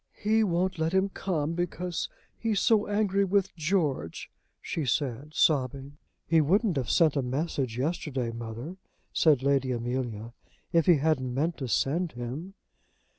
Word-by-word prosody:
"He 220 +1 +2
won't 185 -2 0
let 160 +2 0
him 190 +1 +3
come 165 -5 -2
because 175 0 -3 0.3
he's 220 -3 0
so 215 0 +3
angry 205 -1 +1
with 195 0 +1
George," 150 - -1 0.3
she 160 - -3
said, 140 +2 -2
sobbing. 140 0 +1 0.3
"He 165 -1 +4
wouldn't 195 +5 +2
have 130 - -2
sent 160 -4 +4
a 140 - +2
message 130 -2 -2
yesterday, 135 -4 -2
mother," 115 +9 -7 0.4
said 145 -5 +4
Lady 135 -2 +2
Amelia, 120 -2 -3 0.4
"if 165 -2 +3
he 175 - +7
hadn't 140 -4 +1
meant 160 +5 0
to 130 - -4
send 160 +8 0
him." 130 +11 -6
155 Hz, 145 wpm, -28 LUFS, 130-180 Hz, 0.4 s, he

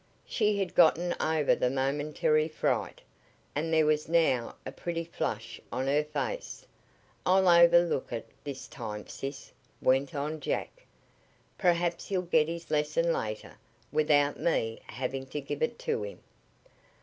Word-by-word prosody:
She 210 -2 +1
had 195 -3 -2
gotten 175 +1 +4
over 155 -2 +2
the 125 - +1
momentary 145 +3 +1
fright, 155 - -1 0.5
and 160 +3 -2
there 160 -1 +4
was 150 0 +1
now 160 -8 +2
a - - -5
pretty 170 -1 -4
flush 115 -8 -4
on 130 +2 -2
her 145 +2 +2
face. - - -4 0.6
"I'll 190 +1 +4
overlook 170 -3 +5
it 115 -2 -4 0.2
this 140 -2 -6
time, 105 -4 -6
sis," 135 0 -7 0.3
went 135 +4 +2
on 150 +2 -2
Jack. - - -4 0.7
"Perhaps 175 -2 +1
he'll 185 -2 0
get 160 -3 +3
his 165 -1 -6
lesson 155 +3 +1
later 110 0 -4 0.3
without 150 -1 +3
me 115 -9 0
having 130 +2 -4
to 150 - -4
give 145 +1 -5
it 235 0 0
to - - -2
him." 100 - -7
155 Hz, 140 wpm, -29 LUFS, 135-170 Hz, 0.7 s, overlook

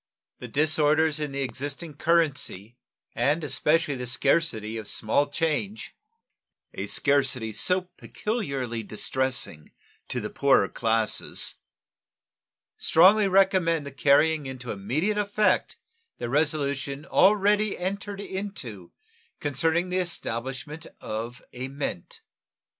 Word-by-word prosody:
The 125 - -7
disorders 155 +3 +2
in 150 -2 -3
the 140 0 -2
existing 145 +4 -4
currency, 145 - 0 0.4
and 150 +3 +1
especially 150 +2 +1
the 125 -2 -5
scarcity 125 -4 +1
of 110 -2 -6
small 130 +7 +1
change, 165 +8 -2 0.8
a - - -4
scarcity 135 -6 +1
so 185 - +1 0.2
peculiarly 140 - -3
distressing 120 - -2 0.4
to - - -2
the - - -5
poorer 140 -1 +3
classes, 115 -2 +1 1.3
strongly 195 +5 +5
recommend 185 -5 +3
the 140 - -7
carrying 145 +2 +3
into 130 -2 -6
immediate 155 - -1
effect 210 +1 +1 0.4
the 120 -1 -4
resolution 140 -1 0
already 205 +2 +3
entered 200 +2 -4
into 190 - -6 0.5
concerning 160 +5 0
the 185 +1 0
establishment 145 -3 -4
of 115 +3 -5
a 125 +1 -5
mint. 135 -10 -5
145 Hz, 105 wpm, -26 LUFS, 130-170 Hz, 1.3 s, strongly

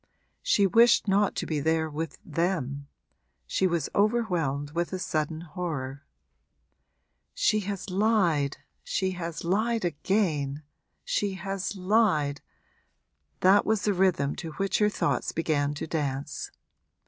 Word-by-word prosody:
She 200 - +3
wished 230 +3 +5
not 200 +1 +2
to - - -2
be 155 -2 -1
there 160 +2 +1
with 155 0 -5
them 150 -5 -2 0.6
she 190 - +1
was 170 -5 0
overwhelmed 180 - +1
with 170 +2 -2
a - - -1
sudden 155 -3 -2
horror. 150 -6 -5 1.3
'She - - +2
has 195 -1 -4
lied 180 -8 +2 0.3
she 190 -1 -1
has 170 -3 -5
lied 215 +4 +1
again 155 -4 0 0.4
she 200 -2 0
has 195 +1 -4
lied!' 185 -8 +2 1.0
that 195 +2 +6
was 220 -1 0
the 205 - +2
rhythm 175 -7 +2
to 160 -2 -6
which 195 +3 0
her 210 -1 +4
thought - - -1
began 145 -3 0
to - - -4
dance. 145 -3 -3
175 Hz, 125 wpm, -27 LUFS, 150-195 Hz, 1.3 s, that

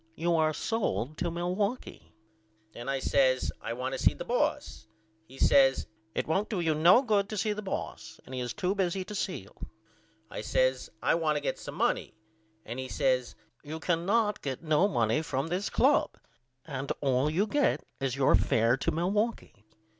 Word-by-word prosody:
You 170 +1 +1
are 155 -1 +3
sold 155 - -2
to 175 - 0
Milwaukee. 185 +8 -3 0.6
Then 120 +3 -7
I 135 - 0
says 130 -1 +2
I 115 - -4
want 130 +2 -3
to 135 - -3
see - - +3
the - - -7
boss. 290 - -1 0.4
He 130 +3 -14
says 135 -1 +4 0.3
It - - 0
won't 195 +7 0
do 205 - -2
you 165 -2 +1
no 170 - +6
good 205 -5 +1
to 215 - -4
see 210 +2 0
the 210 - -5
boss 195 - -6
and - - -11
he 130 - -3
is 125 - -3
to 190 -2 0
busy 190 -1 -1
to 210 - -8
see 200 - -2
you. - - -17 0.7
I - - -6
says - - +1
I - - +3
want 160 -2 +1
to - - 0
get 145 - -3
some - - -8
money. - - 0 0.5
And 120 +3 -6
he 130 - -4
says 130 -2 0 0.3
You 155 +2 -6
cannot 195 +6 +1
get 135 +2 -4
no 155 +4 +3
money 120 - +1
from 145 -1 -2
this 185 +4 -1
club - - +2 0.5
and 135 -3 -4
all 135 0 +2
you 180 +7 +1
get 290 +6 +1 0.2
is 135 -2 -1
your 140 -1 +3
fair 115 +5 +3
to - - -1
Milwaukee. 190 - -2
160 Hz, 185 wpm, -29 LUFS, 130-200 Hz, 0.7 s, no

